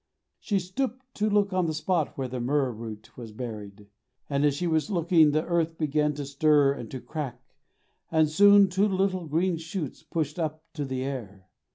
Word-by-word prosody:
She 200 - 0
stooped 250 +7 -4
to 215 +1 0
look 205 -1 +2
on 185 -2 +1
the 160 - -2
spot 160 0 -1
where 135 -1 -2
the 125 0 -5
myrrh 135 +1 +1
root 110 -2 -9
was 115 -3 -9
buried, 105 -3 -7 0.5
and 140 0 +1
as 145 -2 +3
she 175 - -2
was 160 +2 +1
looking, 170 -4 +4
the 155 +2 0
earth 165 -1 0
began 150 -1 +1
to 145 -1 -4
stir 140 0 +3
and 120 -5 -8
to 130 - -6
crack, 135 -4 -5 0.7
and 160 -1 +4
soon 200 +5 +6
two 190 +3 +2
little 190 -3 0
green 170 +3 +1
shoots 160 -2 -5
pushed 155 0 -3
up 155 -1 -3
to 150 -3 -3
the 130 -1 -3
air. 100 -9 -6
155 Hz, 190 wpm, -27 LUFS, 135-180 Hz, 0.7 s, soon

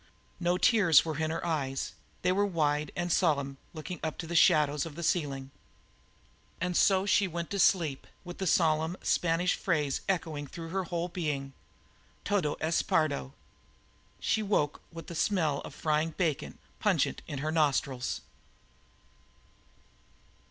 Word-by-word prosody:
No 175 0 +1
tears 180 -7 +5
were 160 -2 -3
in 160 0 0
her 165 +2 -3
eyes; 135 -5 -2 0.3
they 180 - +3
were 200 +2 +2
wide 150 -6 0
and 175 -1 0
solemn, 140 -6 +1
looking 160 +1 -7
up 160 -1 -3
to 165 - -5
the 170 +1 -5
shadows 150 -4 +4
of 165 -3 -7
the 170 - -6
ceiling, 140 -6 -1 1.1
and 180 0 -1
so 190 +1 +4
she 200 0 +3
went 170 -1 -5
to 200 - -2
sleep 165 -8 +2 0.2
with 175 -1 -9
the 190 - -1
solemn 160 +1 +2
Spanish 175 +1 +2
phrase 150 -7 0
echoing 160 -6 -1
through 165 +4 -8
her 190 +1 -2
whole 170 0 -2
being: 150 -6 -3 0.7
"Todo 185 -8 +1
es 160 +1 +1
perdo!" 70 - 0 0.9
She 220 - +1
woke 195 -8 0
with 165 -2 -9
the - - -8
smell 160 -5 +1
of - - -9
frying 155 +1 0
bacon 160 -6 -1 0.2
pungent - - +1
in 145 - -5
her 155 +3 -2
nostrils. 140 -5 0
165 Hz, 145 wpm, -30 LUFS, 150-180 Hz, 1.1 s, tears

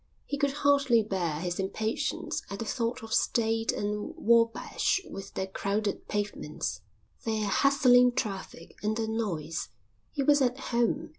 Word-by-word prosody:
He - - -3
could 280 0 +1
hardly 280 -5 +4
bear 175 -7 -2
his 175 0 -3
impatience 215 +3 -2
at 200 - -5
the 230 - -4
thought 230 +1 -2
of 220 0 -5
State 225 -1 +2
and 210 0 -3
Wabash 230 - +2
with 195 - -8
their 190 - -1
crowded 200 +2 -2
pavements, 205 0 -3 0.4
their 220 -2 0
hustling 250 +2 +5
traffic, 195 -6 -4
and 215 +1 0
their 225 -1 -1
noise. 185 -8 -2 0.4
He 280 - -1
was 290 +1 +5
at 250 -1 +2
home. 265 +5 0
225 Hz, 145 wpm, -29 LUFS, 200-245 Hz, 0.4 s, hustling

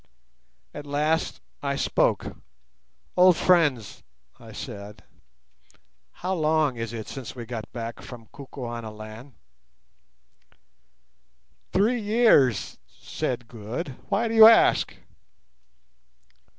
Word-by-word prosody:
At 145 0 -9
last 150 +3 -1 0.2
I 140 -1 -2
spoke. - - 0 0.8
"Old 180 -2 +6
friends," 150 - +2 0.4
I - - -13
said, 105 +1 -9 1.1
"how 185 +2 -4
long 155 -5 +1
is 115 -1 -5
it 110 -3 -7
since 130 -3 -8
we 120 -2 -7
got 115 -2 -7
back 115 -1 -6
from 120 -3 -11
Kukuanaland?" 115 -2 -8 2.4
"Three 225 +5 +2
years," 205 - +3
said 125 -2 -5
Good. 115 +8 -6 0.2
"Why 215 +3 +1
do 225 - -3
you 220 -1 +10
ask?" 225 0 +4
135 Hz, 95 wpm, -25 LUFS, 115-180 Hz, 2.4 s, you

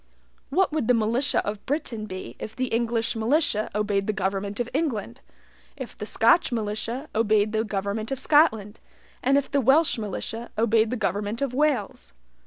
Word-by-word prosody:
What 370 +5 +2
would 300 -7 -1
the 250 - +5
militia 230 +5 +1
of 205 0 -4
Britain 250 -7 -3
be 185 -1 -7
if 220 - -7
the 255 +1 -2
English 230 0 0
militia 225 -1 +1
obeyed 205 -2 0
the 215 - +1
government 200 +1 -2
of 240 - -1
England, 265 -5 -2 0.6
if 260 -4 -7
the 210 - -6
Scotch 235 +9 +4
militia 230 +4 -3
obeyed 215 -1 +2
the 220 0 0
government 205 +2 -3
of 270 - -1
Scotland, 245 -9 +3 0.4
and 270 +2 +3
if 280 - -1
the 280 - +2
Welsh 270 +2 +4
militia 225 +3 -5
obeyed 225 0 +3
the 250 - -2
government 205 +2 -2
of 270 -3 -2
Wales? 245 - -1
225 Hz, 170 wpm, -25 LUFS, 210-260 Hz, 0.6 s, the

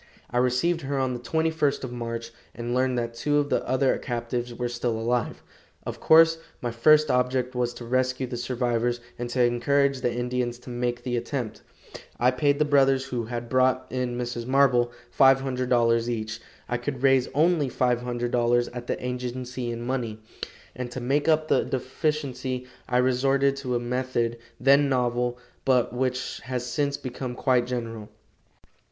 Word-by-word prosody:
I 120 - -1
received 130 +8 +1
her 140 0 -2
on 130 -1 0
the 120 - -4
21st 160 +1 0
of 130 - -4
March, 115 -1 -5 0.2
and 120 0 -3
learned 130 0 +1
that 115 -1 -2
two 145 +5 0
of 145 0 0
the - - +1
other 130 +1 +2
captives 120 -1 -3
were 120 +1 -3
still 120 -1 -2
alive. 120 0 -1 0.4
Of - - -5
course, 165 0 +6 0.2
my 120 - -3
first 150 +5 +5
object 125 0 +1
was 125 -1 0
to 120 - -8
rescue 130 +1 0
the 125 0 -5
survivors, 120 -1 -1 0.2
and 120 0 -3
to 125 0 +2
encourage 135 +3 +2
the 120 - +1
Indians 120 0 -2
to 125 - -9
make 120 0 -2
the 120 -1 -1
attempt, 120 -3 -4 0.6
I 125 +1 +4
paid 140 +2 +2
the 150 - +2
brothers 135 -2 +3
who 125 -3 -3
had 120 +1 -5
brought 130 +1 +2
in 125 -1 -2
Mrs. 120 -1 -4
Marble 130 -3 +3 0.2
$500 125 -3 +3
each. 115 -1 -3 0.3
I 120 - -1
could 130 +1 -5
raise 135 -2 +4
only 155 -2 +3
$500 120 -1 +1
at 120 0 -7
the - - -3
agency 125 0 -4
in 120 0 -4
money, 120 -4 -2 0.6
and 125 0 -4
to 120 - -6
make 135 +5 0
up 155 -1 +3
the - - +3
deficiency 130 -2 -2 0.2
I 125 - +2
resorted 135 +2 +2
to 130 -3 -2
a - - +1
method, 120 -1 -1 0.2
then 140 +2 +5
novel, 125 -1 0 0.3
but 125 -3 +2
which 130 0 -2
has 125 -1 -3
since 140 +2 -1
become 125 -1 -5
quite 125 -2 +2
general. 115 -4 -4
125 Hz, 165 wpm, -26 LUFS, 120-135 Hz, 0.6 s, course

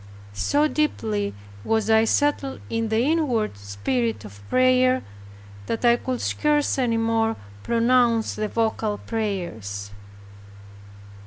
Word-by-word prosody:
So 290 - +2
deeply 220 -10 -1 0.3
was 220 - 0
I 220 0 +5
settled 285 +2 0
in 225 -1 -1
the 220 +1 +2
inward 265 - +1
spirit 105 +2 -2
of 100 -1 -12
prayer, 255 0 +3 0.6
that 230 - -2
I 235 0 +6
could 255 0 -3
scarce 295 -2 +1
any 235 -3 +1
more 225 0 +1 0.3
pronounce 235 - +2
the 215 - -2
vocal 220 -1 -1
prayers. 170 - -4
225 Hz, 110 wpm, -24 LUFS, 200-255 Hz, 0.6 s, I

